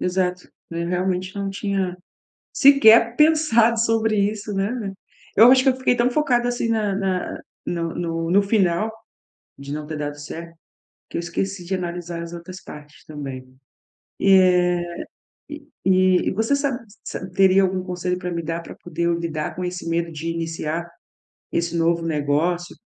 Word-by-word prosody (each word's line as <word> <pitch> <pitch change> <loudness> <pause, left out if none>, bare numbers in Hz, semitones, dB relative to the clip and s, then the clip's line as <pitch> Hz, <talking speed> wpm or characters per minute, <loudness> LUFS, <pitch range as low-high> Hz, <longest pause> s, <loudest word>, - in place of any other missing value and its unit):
Exato, 180 0 -1 0.2
eu, 170 0 -3
realmente, 185 +1 -1
não 200 -1 -3
tinha 195 -2 -2 0.6
sequer 235 -5 +6
pensado 300 -8 +4
sobre 225 -1 +1
isso, 210 0 -6
né, 200 +1 -2 0.4
eu 230 +4 +9
acho 260 0 +6
que - - +4
eu 255 - -2
fiquei 260 -1 +1
tão 240 +1 +2
focada 245 -3 +1
assim 240 -1 -1
na 215 -3 0
na 190 -2 -2 0.3
no 170 -1 -2
no 165 -1 -2
no 200 +3 +5
final, 200 0 +1 0.7
de 140 +1 -7
não 150 0 -5
ter 155 -1 -5
dado 145 0 -4
certo, 165 +3 -8 0.5
que - - -6
eu - - 0
esqueci 180 +2 -3
de 190 +2 -3
analisar 175 -1 -4
as 170 0 -8
outras 175 +2 -9
partes 150 0 -12
também. 135 -4 -7 0.7
E, 195 - +4
é, 180 -2 +5 0.8
e 295 0 -9 0.6
e - - +2
você 225 +7 +1
sabe 280 -3 -1 0.3
sa 185 - -6
teria 190 +1 +5
algum 185 0 0
conselho 180 0 -2
para 180 0 -5
me 170 -1 -2
dar 165 +1 -3
para - - -11
poder 170 0 -5
eu 170 - +2
lidar 160 -2 -3
com 180 - -3
esse 180 -1 -5
medo 170 0 0
de 160 +2 -5
iniciar 165 0 -3 0.6
esse 170 0 -1
novo 165 0 +2
negócio? 160 +3 0
180 Hz, 165 wpm, -22 LUFS, 170-215 Hz, 0.8 s, eu